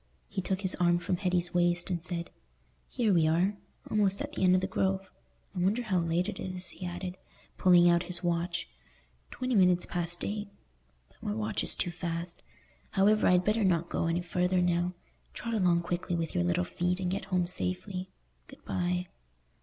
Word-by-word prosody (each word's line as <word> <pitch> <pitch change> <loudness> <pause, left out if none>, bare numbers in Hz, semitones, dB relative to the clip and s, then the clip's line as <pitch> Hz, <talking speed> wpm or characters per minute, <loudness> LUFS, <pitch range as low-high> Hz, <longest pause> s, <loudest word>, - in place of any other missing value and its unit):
He - - -2
took 190 +1 -2
his 190 -2 +5
arm 175 -1 +4
from 180 +1 -1
Hetty's 180 -1 0
waist, 175 +1 +1
and 170 -2 -2
said, 175 -1 -4 0.6
"Here 230 -5 +1
we 165 -3 +4
are, 175 +6 +2 0.3
almost 200 -2 +2
at - - -4
the - - -2
end 185 0 +6
of 185 - +2
the - - 0
Grove. 190 0 -1 0.4
I - - -2
wonder 200 +7 +1
how 195 -5 +1
late 170 +2 0
it 215 - -5
is," 185 -1 -3
he 180 - -6
added, 180 +1 -5 0.4
pulling 175 -1 +6
out 170 0 +4
his 175 0 0
watch. 170 0 -1 0.6
"Twenty 255 -1 -3
minutes 180 -4 +4
past 175 0 -2
eight—but 60 - -9
my 105 - -2
watch 110 0 -1
is - - +3
too 175 - -2
fast. 170 0 -5 0.5
However, 210 +2 +3
I'd 180 0 +4
better 215 +1 +2
not 170 -3 +2
go - - -1
any 170 +1 0
further 180 +1 +1
now. 175 0 +1 0.4
Trot 230 -1 -4
along 180 -5 +3
quickly 175 +1 -2
with 165 -1 -2
your 85 - +1
little 85 0 +1
feet, 180 - -1
and 180 -1 -1
get 195 - -3
home 185 -2 +1
safely. 185 +1 -4 0.4
Good - - -15
bye." 180 0 -1
180 Hz, 185 wpm, -30 LUFS, 170-190 Hz, 0.6 s, end